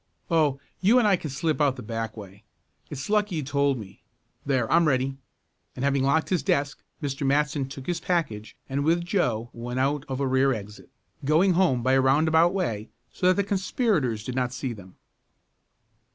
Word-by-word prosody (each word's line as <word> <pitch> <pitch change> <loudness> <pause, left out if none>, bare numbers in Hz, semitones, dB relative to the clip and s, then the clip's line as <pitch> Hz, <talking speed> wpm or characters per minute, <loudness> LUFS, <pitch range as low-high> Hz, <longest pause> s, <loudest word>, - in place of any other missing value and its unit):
"Oh, 150 -4 +2 0.2
you 210 +7 +4
and 240 -4 +4
I 200 - +5
can 160 -3 -6
slip 150 +3 -1
out 140 -3 +3
the 125 - -9
back 115 0 -4
way. 100 0 -11 0.5
It's 140 -1 -6
lucky 210 -3 +1
you 155 - -2
told 140 0 +1
me. 100 -4 -11 0.4
There, 130 -5 0
I'm 170 -1 +4
ready," 135 -1 0 0.6
and 130 - -2
having 140 -1 +2
locked 140 +4 +2
his 180 -3 +1
desk, 140 0 0 0.2
Mr. 140 0 -3
Matson 140 0 +1
took 135 -1 -9
his 175 +1 -2
package 140 - -2
and 140 +1 -1
with 170 +3 +1
Joe 120 - -1
went 120 +2 -4
out 140 +1 +1
of 130 -1 -4
a 140 - 0
rear 130 +1 +3
exit, 105 -2 -9 0.3
going 160 +7 +3
home 165 -10 +2
by 130 +1 +2
a 135 - +4
roundabout 160 +5 +4
way 115 - -2 0.2
so 180 - 0
that 185 - +5
the 200 - +1
conspirators 190 - 0
did 125 - -5
not 125 -1 -1
see 125 0 -3
them. 95 -4 -13
140 Hz, 190 wpm, -26 LUFS, 125-165 Hz, 0.6 s, I